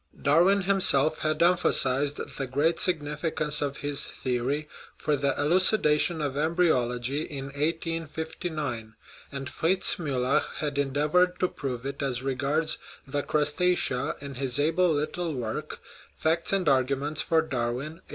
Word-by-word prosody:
Darwin 175 +8 +4
himself 170 -6 +4
had 155 +1 0
emphasized 145 -5 +2 0.2
the 135 - -2
great 145 +6 +1
significance 150 -3 0
of 140 -1 -2
his 145 -1 +1
theory 130 +4 -2 0.3
for 150 - 0
the 140 0 -1
elucidation 160 -1 +3
of 140 -2 -2
embryology 145 -5 +1
in 140 -3 -6
1859, 155 -5 -3 0.4
and 135 -1 -5
Fritz 180 +6 +2
Miiller 140 -2 +1 0.2
had 145 -2 -2
endeavored 150 +6 +1
to 185 - +2
prove 130 -7 -6
it 140 +1 -5
as 130 -2 -2
regards 140 +4 0 0.3
the 145 +1 -2
Crustacea 150 -2 +1
in 140 -1 -7
the 130 0 0
able 170 +3 +2
little 155 +2 -2
work, 115 -3 -5 0.4
Facts 165 +1 0
and 195 -2 +1
Argu 135 -1 +2
ments 145 +3 -2
for 160 -1 +2
Darwin 130 +5 -4
(1864). - - -30
150 Hz, 135 wpm, -27 LUFS, 135-165 Hz, 0.4 s, Darwin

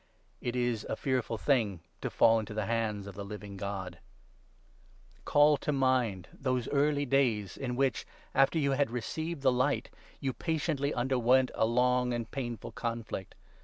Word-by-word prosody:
It 120 0 -2
is 120 -3 0
a - - 0
fearful 125 -3 -1
thing 110 - +1 0.2
to - - -2
fall 115 0 +5
into 105 0 -6
the 110 -1 -1
hands 110 -3 -1
of 100 - -8
the 100 +2 -6
Living 100 0 -8
God. 95 -2 -5 1.2
31 - - -29
Call 145 0 +5
to 150 - -2
mind 130 -9 +1
those 130 -3 -1
early 145 0 +2
days 120 -7 +1
in 125 -2 -3
which, 135 -2 0 0.3
after 135 +4 +4
you 140 -3 +2
had 140 +1 +2
32 115 - -11
received 160 +7 -3
the 130 - +5
Light, 130 +3 0 0.3
you 135 -2 -1
patiently 155 -3 -1
underwent 130 0 +3
a 110 - +2
long 125 +1 +2
and 115 -1 -4
painful 120 -5 -4
conflict. 115 -5 -4
125 Hz, 165 wpm, -31 LUFS, 110-135 Hz, 1.2 s, fall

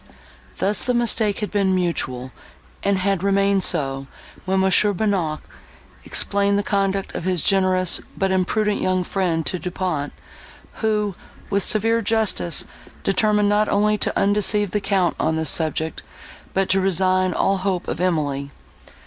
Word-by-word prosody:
Thus 195 0 +1
the 250 - 0
mistake 225 -3 +2
had 210 - -3
been 195 -2 +1
mutual, 130 -8 -2 0.5
and 200 -1 +1
had 195 -1 0
remained 195 0 +2
so, 135 -1 0 0.4
when 190 0 +1
Mons. 190 -1 +4
Bonnac 195 -6 -1 0.6
explained 200 0 +1
the 205 - 0
conduct 195 -1 -1
of - - -5
his 180 -4 0
generous, 185 -2 +2 0.2
but 195 -1 0
imprudent 205 +3 0
young 185 -1 +1
friend 175 -4 -1
to 180 - -2
Du 180 - -4
Pont, 175 -6 -3 0.7
who, 210 -2 0 0.4
with 200 - +2
severe 225 +4 +2
justice, 220 -5 +1 0.4
determined 210 +1 +2
not 210 +1 +2
only 210 +1 +2
to - - +1
undeceive 205 0 +2
the 210 - -1
Count 190 -3 0
on 160 - 0
this 160 0 +2
subject, 160 -1 -1 0.5
but 195 0 +1
to 195 +1 +2
resign 185 0 +2
all 195 0 +1
hope 185 -1 -2
of - - -3
Emily. 145 -6 -1
190 Hz, 150 wpm, -21 LUFS, 180-205 Hz, 0.7 s, Mons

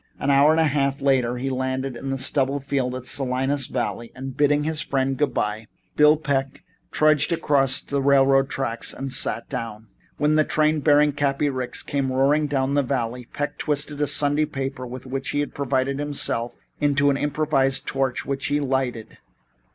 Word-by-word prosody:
An 140 - +1
hour 140 +2 +5
and 160 +1 +3
a - - +5
half 140 -2 0
later 130 -3 +1
they 135 +2 -3
landed 130 0 -2
in 135 +3 -5
a 135 - -1
stubble 135 +1 0
field 135 -2 -2
in 130 - -5
the - - -20
Salinas 135 +1 -1
Valley 120 -2 -4
and, 130 0 -7
bidding 145 0 +2
his 155 0 -1
friend 135 0 -1
good 145 0 0
bye, 105 +1 -2 0.3
Bill 150 +1 +5
Peck 135 -3 -2 0.3
trudged 155 +1 +3
across 140 -5 +2
to - - -12
the 140 - +1
railroad 135 0 +4
track 120 -5 -3
and 135 -1 -3
sat 115 - 0
down. 110 -1 -6 0.3
When 150 +1 +2
the 155 0 +4
train 155 +1 +1
bearing 150 0 +4
Cappy 145 0 0
Ricks 130 -2 -2
came 140 -2 -2
roaring 140 +3 +2
down 135 -1 -1
the 145 - +3
valley, 125 -2 -3
Peck 145 0 -4
twisted 150 0 -1
a 150 - +2
Sunday 145 +2 +2
paper 135 -3 -5
with 125 +1 -8
which 135 +1 -4
he 145 - -1
had 145 - -3
provided 135 0 -1
himself, 140 -5 -2 0.2
into 145 -1 +3
an 135 - 0
improvised 145 -2 0
torch, 135 -2 -1
which 135 -1 -3
he 145 +1 +1
lighted. 130 -5 -3
135 Hz, 190 wpm, -23 LUFS, 130-145 Hz, 0.3 s, hour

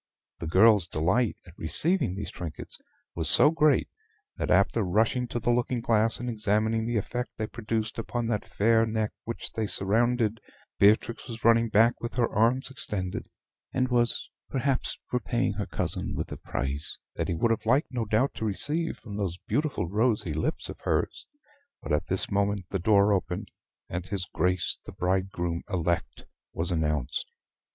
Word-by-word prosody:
The 85 - -4
girl's 100 +1 +5
delight 85 +10 +1
at 85 -2 -16
receiving 155 - +4
these 100 +1 -5
trinkets 80 -4 -8 0.3
was 80 -2 -2
so 150 - +6
great, 155 -4 +3 0.5
that - - -3
after 100 +4 +3
rushing 110 +6 +1
to 120 - -3
the 120 +1 +1
looking 120 +1 0
glass 115 -1 +1
and 125 - -4
examining 110 0 +1
the 120 -1 0
effect 120 +4 -3
they 110 - -1
produced 110 0 -3
upon 120 +1 -3
that 115 -3 -1
fair 115 +2 +2
neck 110 -1 -1
which 115 - -5
they 110 -1 -2
surrounded, 115 +2 +1 0.4
Beatrix 110 +4 +3
was 115 -2 -8
running 115 0 +5
back 115 +3 +4
with 115 -1 -5
her 120 -2 +2
arms 120 +5 +1
extended, 95 -8 -4 0.4
and 130 0 0
was 120 -1 +1 0.2
perhaps 135 0 -1
for 125 - -1
paying 120 0 -1
her - - -4
cousin - - -2
with - - -4
a - - -5
price, 70 +2 -4 0.2
that - - -2
he 85 - -1
would 115 +8 +1
have 110 -1 -1
liked 135 +6 +2
no 120 -3 -2
doubt 110 +6 +1
to 110 - -4
receive 150 - +1
from 105 -3 -8
those 95 -4 -2
beautiful 145 - 0
rosy 105 -3 +1
lips 80 - -2
of - - -8
hers, - - -1 0.5
but - - -3
at 75 0 0
this 95 - +1
moment 100 -1 0
the 95 - -1
door 100 +2 +4
opened, 90 -2 -2 0.4
and 90 +1 -5
his 95 -3 -3
Grace 90 0 0
the - - -9
bridegroom 90 -2 -1
elect 85 -3 -2 0.3
was 85 +2 -2
announced. 75 -5 -1
110 Hz, 170 wpm, -27 LUFS, 95-120 Hz, 0.5 s, so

